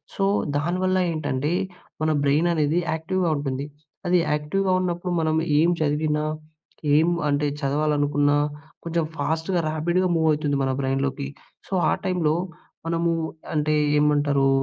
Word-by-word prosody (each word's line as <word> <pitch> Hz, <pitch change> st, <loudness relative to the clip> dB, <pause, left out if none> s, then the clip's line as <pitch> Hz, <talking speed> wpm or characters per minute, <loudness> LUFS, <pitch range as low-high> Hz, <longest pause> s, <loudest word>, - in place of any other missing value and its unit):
So, 195 Hz, -, -1 dB, 0.3 s
దానివల్ల 185 Hz, +4 st, 0 dB
ఏంటంటే, 150 Hz, -2 st, -1 dB, 0.5 s
మన 155 Hz, -, +2 dB
బ్రె‌యిననేది 155 Hz, +2 st, +2 dB
యాక్టివ్‍గా 165 Hz, +2 st, -1 dB
ఉంటుంది. 140 Hz, 0 st, -3 dB, 0.4 s
అది 180 Hz, 0 st, +4 dB
యాక్టివ్‌గా 185 Hz, +6 st, 0 dB
ఉన్నప్పుడు, 175 Hz, 0 st, -2 dB
మనం 155 Hz, 0 st, +1 dB, 0.2 s
ఏం 170 Hz, +2 st, +4 dB
చదివినా, 150 Hz, 0 st, +1 dB, 0.7 s
ఏం 160 Hz, +3 st, +4 dB, 0.2 s
అంటే, 145 Hz, +1 st, +1 dB
చదవాలనుకున్నా, 145 Hz, 0 st, +2 dB, 0.5 s
కొంచెం 170 Hz, 0 st, 0 dB
ఫాస్ట్‌గా, 160 Hz, +5 st, 0 dB
ర్యాపిడ్‌గా 175 Hz, +4 st, +1 dB
మూవ్ 160 Hz, -1 st, +3 dB
అయితుంది 145 Hz, -2 st, -1 dB
మన 135 Hz, -, +1 dB
బ్రె‌యిన్‌లోకి. 135 Hz, +1 st, -1 dB, 0.4 s
సో, -, -, -6 dB, 0.2 s
ఆ -, -, +3 dB
టైంలో, 170 Hz, -4 st, +1 dB, 0.5 s
మనము 170 Hz, 0 st, +1 dB, 0.4 s
అంటే, 155 Hz, 0 st, +2 dB, 0.2 s
ఏమంటరు, 145 Hz, -2 st, +3 dB
155 Hz, 120 wpm, -24 LUFS, 145-170 Hz, 0.7 s, అది